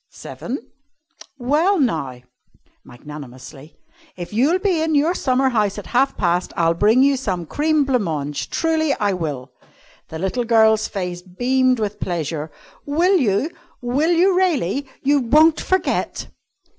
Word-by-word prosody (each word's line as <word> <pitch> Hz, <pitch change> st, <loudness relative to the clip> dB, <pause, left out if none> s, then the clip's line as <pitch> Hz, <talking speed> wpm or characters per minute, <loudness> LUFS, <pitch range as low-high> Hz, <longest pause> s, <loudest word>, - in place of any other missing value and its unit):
"Seven." 255 Hz, +1 st, -8 dB, 0.7 s
"Well, 305 Hz, +10 st, +1 dB
now," 150 Hz, -, -1 dB, 0.6 s
magnanimously, 135 Hz, +2 st, -12 dB, 0.4 s
"if 175 Hz, +3 st, -7 dB
you'll 275 Hz, -, +3 dB
be 375 Hz, -4 st, 0 dB
in 320 Hz, -1 st, 0 dB
your 305 Hz, +5 st, +2 dB
summer 265 Hz, -5 st, +1 dB
house 210 Hz, -5 st, 0 dB
at 205 Hz, -, -7 dB
half 265 Hz, +3 st, +1 dB
past, 175 Hz, -1 st, 0 dB
I'll 165 Hz, -1 st, +2 dB
bring 220 Hz, +9 st, +3 dB
you 280 Hz, 0 st, +3 dB
some 190 Hz, -10 st, -3 dB
cream 300 Hz, -, +1 dB
blanc 260 Hz, -3 st, +1 dB
mange. 150 Hz, -5 st, -3 dB
Truly 320 Hz, -3 st, 0 dB
I 205 Hz, -2 st, 0 dB
will!" 145 Hz, -7 st, -5 dB, 0.6 s
The 160 Hz, -, -6 dB
little 190 Hz, +8 st, -2 dB
girl's 220 Hz, -2 st, +3 dB
face 180 Hz, -3 st, -5 dB
beamed 250 Hz, +7 st, 0 dB
with 210 Hz, -1 st, -3 dB
pleasure. 160 Hz, -3 st, -3 dB, 0.3 s
"Will 345 Hz, +7 st, +2 dB
you? 255 Hz, -, 0 dB, 0.3 s
Will 265 Hz, +6 st, 0 dB
you 360 Hz, +2 st, +3 dB
really? 285 Hz, -, 0 dB, 0.2 s
You 285 Hz, +1 st, +3 dB
won't 305 Hz, +6 st, +4 dB
forget?" 375 Hz, 0 st, -1 dB
240 Hz, 140 wpm, -20 LUFS, 175-290 Hz, 0.7 s, won't